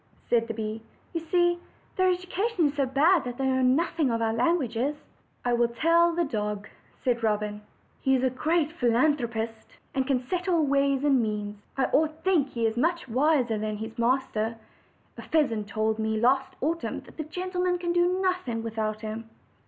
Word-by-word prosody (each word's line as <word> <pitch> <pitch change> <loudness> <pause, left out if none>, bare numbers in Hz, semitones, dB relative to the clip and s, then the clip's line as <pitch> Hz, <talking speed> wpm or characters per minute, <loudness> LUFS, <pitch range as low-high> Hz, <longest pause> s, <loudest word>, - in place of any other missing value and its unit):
said 230 -1 +2
the 225 - -3
bee. 220 0 -4 0.3
"You 335 - 0
see, 345 +1 +2 0.4
their 370 0 +3
education 365 -1 0
is - - -6
so 280 -2 0
bad 305 +6 +4
that 245 -1 -5
they 270 - -1
know 260 0 +2
noth 305 +7 +2
ing 290 -5 +3
of 230 -1 0
our 225 -1 +1
languages." 255 0 +1 0.5
"I 245 - +2
will 240 0 +3
tell 335 +8 +3
the 345 - +2
dog," 210 -5 -3 0.4
said 240 -2 +1
Robin; 210 -1 -1 0.4
"he 265 0 +2
is 255 - 0
a 260 - +2
great 310 +3 +1
phi 320 -8 -1
losopher, 235 -3 +1 0.4
and 265 -1 0
can 255 -2 0
settle 355 -1 +1
ways 275 -1 +2
and 275 -4 +4
means. 210 -1 -3 0.2
I 270 - +3
oiten 310 +1 +2
think 340 -8 +2
he 230 -2 -2
is 225 +1 0
much 335 +4 0
wiser 255 -3 +2
than 215 0 -2
his 220 +2 -7
master. 230 -2 0 0.6
A - - -5
pheasant 230 -10 0
told 220 +1 -1
me 220 0 0
last 265 +3 +2
autumn 330 +4 -2
that - - -17
the 310 - -2
gentlemen 360 +2 -1
can 345 -1 -2
do 350 +1 +2
nothing 360 -12 -1
without 215 -1 -3
him." 225 +1 -6
260 Hz, 185 wpm, -27 LUFS, 225-330 Hz, 0.6 s, bad